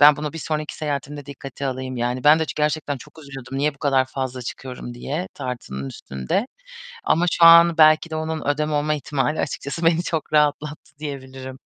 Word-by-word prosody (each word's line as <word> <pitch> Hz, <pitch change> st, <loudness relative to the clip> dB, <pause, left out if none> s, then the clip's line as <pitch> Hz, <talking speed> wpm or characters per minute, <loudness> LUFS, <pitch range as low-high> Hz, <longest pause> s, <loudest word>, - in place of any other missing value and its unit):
Ben 145 Hz, 0 st, +8 dB
bunu 150 Hz, -1 st, -4 dB
bir 165 Hz, -, -6 dB
sonraki 155 Hz, -1 st, -3 dB
seyahatimde 145 Hz, -1 st, -4 dB
dikkate 140 Hz, 0 st, -6 dB
alayım. 130 Hz, -1 st, -4 dB
Yani 125 Hz, +2 st, -2 dB
ben 150 Hz, +2 st, +7 dB
de 160 Hz, -, +1 dB
çı -, -, -6 dB
gerçekten 150 Hz, -1 st, 0 dB
çok 160 Hz, -, -15 dB
üzülüyordum 135 Hz, -1 st, -7 dB
niye 145 Hz, 0 st, +1 dB
bu -, -, -25 dB
kadar 135 Hz, -2 st, +2 dB
fazla 130 Hz, -1 st, -4 dB
çıkıyorum 125 Hz, 0 st, -7 dB
diye 150 Hz, +9 st, -4 dB
tartının 115 Hz, -, -5 dB
üstünde 65 Hz, -, -3 dB, 0.6 s
ama 170 Hz, +2 st, +2 dB
şu 170 Hz, -, +4 dB
an 170 Hz, 0 st, +8 dB
belki 155 Hz, +1 st, +6 dB
de 155 Hz, -, -3 dB
onun 160 Hz, 0 st, -3 dB
ödem 150 Hz, +1 st, 0 dB
olma 150 Hz, +1 st, +1 dB
ihtimali 145 Hz, -1 st, -1 dB
açıkçası 150 Hz, +3 st, -4 dB
beni 165 Hz, +1 st, +3 dB
çok 160 Hz, -3 st, -3 dB
rahatlattı 150 Hz, 0 st, 0 dB
diyebilirim. 130 Hz, -3 st, -7 dB
145 Hz, 185 wpm, -22 LUFS, 130-155 Hz, 0.6 s, Ben